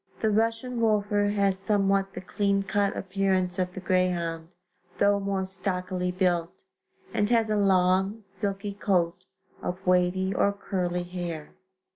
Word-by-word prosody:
The 220 - +1
Russian 230 +3 0
Wolfer 205 -2 +2
has 200 -2 +1
somewhat 195 -1 +1
the - - -5
clean 200 +1 0
cut 200 0 0
appearance 190 -1 0
of 180 0 -1
the - - -4
greyhound, 175 -3 0 0.5
though 200 0 +3
more 195 -1 -1
stockily 185 -1 -2
built, 175 -2 +1 0.6
and 205 0 +1
has 225 -2 +2
a - - +2
long, 190 +1 +3
silky 200 0 -4
coat 185 -3 0 0.4
of 185 +2 -5
wavy 180 +1 +2
or 200 - +2
curly 180 -3 -2
hair. 175 -3 -6
195 Hz, 135 wpm, -27 LUFS, 180-200 Hz, 0.6 s, though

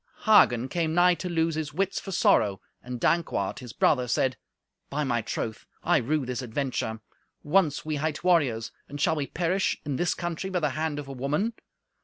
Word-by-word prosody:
Hagen 130 - +5
came 160 +2 -1
nigh 180 +1 +6
to 180 +1 -4
lose 165 -1 +1
his 150 -1 -4
wits 195 +1 0
for 195 - -7
sorrow, 100 - +3 0.2
and 125 0 -6
Dankwart, 135 - 0
his 125 -3 -9
brother, 125 +1 +2
said, 130 +2 +1 0.5
"By 150 +2 -1
my 120 -4 0
troth, 110 0 -4 0.2
I - - +4
rue 145 +3 0
this 125 0 -3
adventure. 120 -3 -3 0.4
Once 155 -2 +2
we 155 -1 -2
hight 155 +1 -2
warriors, 140 -11 +2 0.2
and 145 - -7
shall 160 - +2
we 145 -3 -2
perish 180 +3 0
in 140 -3 -2
this 175 -1 +1
country 175 +2 -4
by 185 -2 0
the 150 -2 +1
hand 155 +1 -2
of 145 -1 -6
a 135 - -6
woman? 150 - -1
150 Hz, 190 wpm, -27 LUFS, 125-170 Hz, 0.5 s, nigh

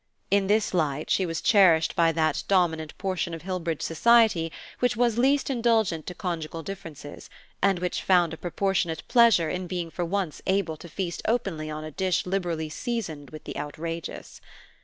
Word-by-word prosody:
In 200 -1 +3
this 210 0 +2
light 155 -4 -1
she 190 - +2
was 165 -1 -3
cherished 175 -7 +4
by 165 -1 +4
that 160 -1 0
dominant 160 -5 +1
portion 185 -3 -2
of 165 - -10
Hillbridge 175 -4 -3
society 205 -2 +4 0.3
which 245 -2 +1
was 235 -1 +2
least 275 +3 +3
indulgent 225 - +1
to 180 - -5
conjugal 165 -3 -4
differences, 160 -6 -9 0.3
and 195 -2 +3
which 180 0 -2
found 175 -3 +3
a - - -6
proportionate 175 -2 -1
pleasure 230 -9 +5
in 180 0 -3
being 175 -2 -4
for 175 - -3
once 180 -2 -2
able 190 -4 +1
to 170 - -11
feast 175 0 -4
openly 195 -10 -1
on 155 0 -5
a 155 - -7
dish 185 +3 0
liberally 175 -4 -2
seasoned 160 -5 -4
with 155 -1 -10
the - - -7
outrageous. 160 +3 -6
175 Hz, 170 wpm, -26 LUFS, 160-195 Hz, 0.3 s, pleasure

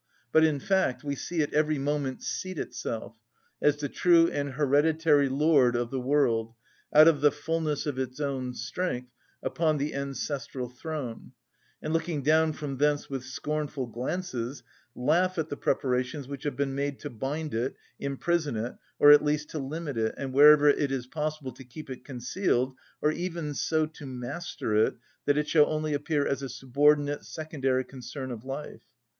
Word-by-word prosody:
But, 160 - +5
in 155 -3 +3
fact, 190 -7 +1
we 140 -1 -2
see 165 +4 -2
it 145 - -2
every 155 0 +2
moment 140 -1 -2
seat 185 -2 -4
itself, 115 -5 -4 0.5
as 150 - +4
the 145 -1 -2
true 170 +3 +5
and 140 -1 -2
hereditary 145 +1 +3
lord 135 -3 +4
of 120 0 -1
the 135 - -1
world, 125 -4 +1 0.4
out 155 +2 +8
of 155 -4 +4
the 145 -1 +6
fulness 155 -1 -2
of 140 -3 -2
its 130 +1 -4
own 130 -3 -2
strength, 125 -9 -3 0.3
upon 155 -2 +1
the 145 +2 -2
ancestral 140 -2 -4
throne, 130 -2 -6 0.5
and 155 - -2
looking 165 -3 -1
down 155 +2 +4
from 145 -3 -5
thence 145 0 +1
with 135 -2 -3
scornful 145 +1 -3
glances, 125 0 -4 0.3
laugh 175 +8 +2
at 160 -1 -1
the - - -3
preparations 130 +1 -1
which 140 0 -7
have 145 - -1
been 140 0 -1
made 140 0 -2
to 145 - -6
bind 145 +7 -4
it, 120 +4 -1 0.2
imprison 145 0 -1
it, 115 +3 -3 0.2
or 145 - +8
at 145 - +8
least 150 0 0
to 155 - -3
limit 145 0 -4
it 110 0 0
and 135 -2 -4
wherever 150 +1 +8
it 145 -1 +3
is 130 -3 -2
possible 150 0 -3
to 135 - -12
keep 130 +3 -10
it 130 - -7
concealed, 130 0 -1 0.3
or 150 - +4
even 170 -3 -3
so 155 +2 +1
to 155 -2 -10
master 125 -1 -4
it 110 +1 +3 0.3
that 145 0 +3
it 150 0 +1
shall 150 -2 +5
only 155 -1 -1
appear 145 0 0
as 140 -1 -1
a 135 - -4
subordinate, 145 +4 +2
secondary 135 -5 -1
concern 130 0 -7
of 115 -2 -7
life. 135 +3 -6
145 Hz, 175 wpm, -28 LUFS, 130-155 Hz, 0.5 s, out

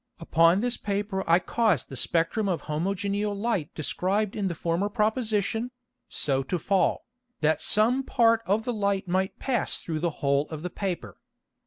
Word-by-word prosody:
Upon 165 +3 +4
this 245 0 -1
Paper 200 -1 -2
I 165 - +7
caused 190 - +1
the 135 - -7
Spectrum 170 - +1
of 175 - -1
homogeneal 200 +6 -1
Light 200 -7 -1
described 190 +6 -1
in 205 -2 -1
the 175 - -3
former 170 +5 -1
Proposition, 220 +1 0 0.4
so 135 -2 0
to 155 +7 -2
fall, 195 +3 +1 0.4
that 155 +1 +2
some 235 +5 +3
part 230 -3 +3
of 210 +4 +1
the 245 - -1
Light 200 -2 0
might 190 +2 0
pass 250 -5 -1
through 160 -2 -4
the 170 +2 0 0.2
Hole 140 +1 +2
of 155 -1 -7
the 180 - -4
Paper. 175 - -4
195 Hz, 165 wpm, -27 LUFS, 165-215 Hz, 0.4 s, I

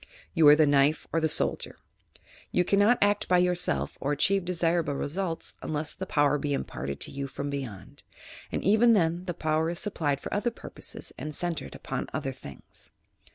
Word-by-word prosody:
You 165 -4 +5
are 145 - +10
the 155 0 +5
knife 145 +1 +3
or 165 - +3
the 160 - +2
soldier. - - 0 0.7
You 180 - +2
cannot 205 +6 +4
act 205 0 +1
by 180 - +4
yourself 180 0 +1
or 140 - 0
achieve 190 +6 +2
desirable 170 -4 0
results 165 +4 -3
unless 150 -1 -3
the 190 - -6
power 145 -2 +2
be 145 0 -1
imparted 70 - -5
to - - -2
you 140 0 -4
from 140 +1 -5
beyond, 130 -9 -7 0.5
and - - -2
even 220 +4 +5
then 175 -2 +1
the 175 -2 -3
power 155 0 0
is 170 - -3
supplied 150 -9 -1
for - - -6
other 210 +4 +1
purposes 230 - -8
and 150 -1 -5
centred 165 -4 -4
upon - - -4
other 135 - -2
things. 70 - -11
160 Hz, 180 wpm, -28 LUFS, 145-180 Hz, 0.7 s, are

